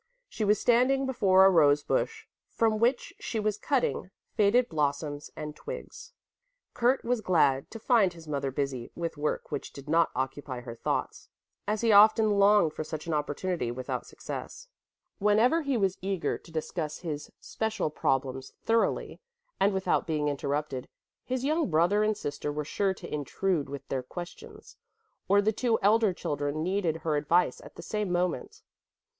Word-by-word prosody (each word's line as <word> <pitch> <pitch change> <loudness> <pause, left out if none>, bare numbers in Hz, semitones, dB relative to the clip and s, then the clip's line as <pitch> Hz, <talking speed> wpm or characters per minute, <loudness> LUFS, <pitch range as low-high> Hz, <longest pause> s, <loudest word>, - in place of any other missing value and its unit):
She 220 - -4
was 210 0 +3
standing 255 +3 +3
before 190 -7 +4
a - - +8
rose 145 -4 +4
bush 445 0 -1 0.2
from 220 -2 +1
which 240 +3 +1
she 225 - -3
was 210 0 -1
cutting 255 -8 0 0.3
faded 225 +4 +4
blossoms 145 -1 -2
and 150 -1 -6
twigs. - - -8 0.6
Kurt 250 +3 +2
was 245 -1 0
glad 140 -9 +2
to 225 - -8
find 220 -4 +3
his 165 -2 -13
mother 140 -2 -2
busy 135 -3 -3
with 170 -1 -3
work 150 0 -3
which - - -4
did 140 0 -11
not 165 +2 +3
occupy 130 0 -3
her 120 -1 -7
thoughts, 115 - -3 0.4
as 210 +1 0
he 230 -1 +3
often 215 0 +6
longed 200 -5 +5
for - - -4
such 155 0 -6
an 165 - -2
opportunity 150 -1 -2
without 125 +1 -4
success. - - -8 0.5
Whenever 220 +10 +3
he 280 -4 0
was 195 -3 0
eager 190 -2 -1
to 165 - -13
discuss 155 -1 -3
his 150 -4 -5
special 220 -8 -2
problems 135 -2 -1
thoroughly 230 0 0 0.4
and 200 +1 +4
without 190 -4 0
being 150 -2 0
interrupted, 140 -1 -3 0.4
his 255 +1 -2
young 310 -2 +1
brother 175 +6 +3
and 215 -1 +1
sister 145 -4 -4
were 150 0 -3
sure 195 +5 0
to - - -9
intrude 150 +1 -1
with 140 -1 -7
their 135 - -2
questions, 175 +7 -10 0.5
or 200 +1 +4
the 215 +2 +2
two 230 0 +1
elder 215 0 +4
children 145 -2 -3
needed 180 -3 0
her 160 -1 -1
advice 170 +5 +2
at - - -13
the - - -9
same 210 -3 -2
moment. 175 -6 -2
180 Hz, 165 wpm, -28 LUFS, 150-215 Hz, 0.6 s, a